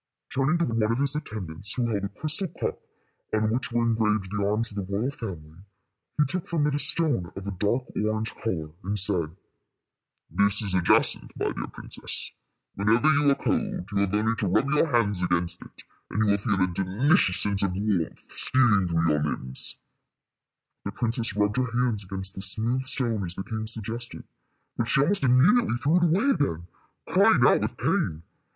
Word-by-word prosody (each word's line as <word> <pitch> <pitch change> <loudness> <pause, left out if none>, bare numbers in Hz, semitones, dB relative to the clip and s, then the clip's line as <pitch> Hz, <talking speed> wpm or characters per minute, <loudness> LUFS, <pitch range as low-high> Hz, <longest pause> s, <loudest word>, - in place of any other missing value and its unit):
Turning 135 +5 +2
to 170 - +1
one 115 -1 -1
of 110 +2 +1
his 140 +1 +4
attendants, 105 - -5
who 125 - 0
held 105 -3 -2
a 100 - -2
crystal 155 - -2
cup 165 - -4 0.6
on 110 0 +1
which 125 +2 -2
were 120 0 +1
engraved 110 -4 0
the 100 - 0
arms 110 +3 +1
of 105 - -10
the 100 -1 -4
royal 110 +7 -1
family, 85 - -8 0.6
he 150 - +4
took 175 +5 -4
from 160 -4 0
it 150 - 0
a 145 - 0
stone 140 - 0
of 95 - -7
a 100 - -3
dark 105 +7 0
orange 110 +1 -1
color, 80 -9 -4
and 105 +2 -2
said, 90 -5 +2 0.9
"This 100 +5 +2
is 100 -3 -2
a 90 - +2
jacinth, 85 - +2
my - - -1
dear - - -5
princess. - - -5 0.4
Whenever 115 +9 +2
you 145 -1 +3
are 140 - +4
cold, 90 - -2
you 100 - -2
have 100 -1 0
only 110 +2 +1
to 100 - -1
rub 135 +10 +1
your 150 +2 +3
hands 110 - +1
against 85 -1 -1
it, - - -14 0.3
and - - -5
you 105 - +3
will 100 - +3
feel 100 -1 0
a 95 - +4
delicious 95 - +2
sense 100 -1 +1
of 95 -2 0
warmth 100 -4 -2
stealing 110 -8 +3
through 85 -1 +1
your 75 -1 +2
limbs." 65 -3 -2 1.1
The 100 - -5
princess 115 -2 0
rubbed 105 +2 +1
her 125 -2 0
hands 120 -5 +1
against 95 +1 -1
the 95 - -7
smooth 115 +7 0
stone 115 -6 0
as 90 0 +3
the 95 - -5
king 110 +1 -5
suggested; 115 +2 -3 0.5
but 120 - 0
she - - +2
almost 180 +8 +2
immediately 135 - +4
threw 150 +7 +2
it 175 - +3
away 190 - +2
again, 85 - -1 0.4
crying - - +4
out - - +5
with - - -3
pain. 80 +1 -1
110 Hz, 195 wpm, -26 LUFS, 95-130 Hz, 1.1 s, out